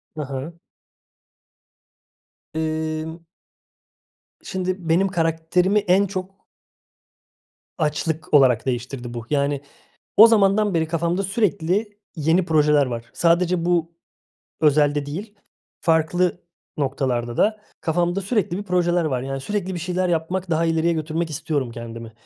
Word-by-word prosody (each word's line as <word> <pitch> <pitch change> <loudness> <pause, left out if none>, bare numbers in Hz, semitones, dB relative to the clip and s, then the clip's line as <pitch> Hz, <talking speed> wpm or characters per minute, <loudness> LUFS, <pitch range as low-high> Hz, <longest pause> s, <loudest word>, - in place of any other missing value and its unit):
Hı 155 - -4
hı. 140 +5 -6 1.9
Emm. 160 +1 -3 1.2
Şimdi 185 -2 -3
benim 180 +4 +3
karakterimi 175 +3 +1
en 195 0 +3
çok 190 0 -6 1.4
açlık 160 +2 -2
olarak 130 -5 +5
değiştirdi 125 -1 -4
bu. 120 -1 -6
Yani, 140 -1 0 0.6
o 220 +3 +11
zamandan 210 -2 +3
beri 160 -1 +1
kafamda 170 +3 0
sürekli 200 0 0 0.2
yeni 165 +3 +2
projeler 150 -3 +4
var. 120 -2 -5
Sadece 170 0 +2
bu 170 -2 +1 0.7
özelde 145 -1 +3
değil, 200 +9 -6 0.5
farklı 175 +2 +1 0.3
noktalarda 130 -4 -1
da 215 0 +2 0.2
kafamda 175 +3 0
sürekli 195 -3 -1
bir - - -3
projeler 175 -3 +1
var. 130 -5 -1
Yani, 135 +1 -4
sürekli 190 +3 -3
bir - - -3
şeyler 180 +2 -1
yapmak, 175 +2 -1
daha 165 +1 +2
ileriye 165 +1 +2
götürmek 160 +1 -2
istiyorum 145 -3 -2
kendimi. 115 -1 -8
165 Hz, 115 wpm, -22 LUFS, 145-185 Hz, 1.9 s, o